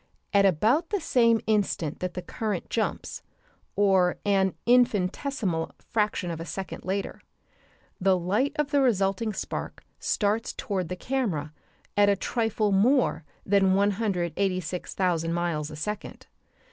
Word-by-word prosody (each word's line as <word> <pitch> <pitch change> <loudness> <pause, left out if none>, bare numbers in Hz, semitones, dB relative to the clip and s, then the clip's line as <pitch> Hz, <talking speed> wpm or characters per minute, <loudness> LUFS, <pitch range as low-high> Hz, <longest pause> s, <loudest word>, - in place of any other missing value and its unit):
At 200 -1 +6
about 225 - +2
the 410 - 0
same 230 -8 +3
instant 200 -8 0
that 180 -1 -4
the 180 - -4
current 215 -6 -4
jumps, 225 - -2 0.5
or 190 -3 +3
an 195 -3 +2
infinitesimal 220 - +1
fraction 210 -5 -1
of 165 - -5
a - - -4
second 190 +2 -6
later, 195 +2 -3 0.8
the 190 0 +3
light 205 +11 0
of 295 -1 -1
the 285 -2 +3
resulting 210 -3 +1
spark 200 - -5 0.2
starts 215 +2 0
toward 185 -5 -3
the 180 - -3
camera 180 - -2 0.4
at 205 0 +5
a 200 - +4
trifle 220 0 0
more 220 - +3 0.2
than 195 -1 +4
186,000 185 -3 0
miles 170 -3 -1
a 155 - -8
second. 210 +7 -5
195 Hz, 130 wpm, -27 LUFS, 180-225 Hz, 0.8 s, At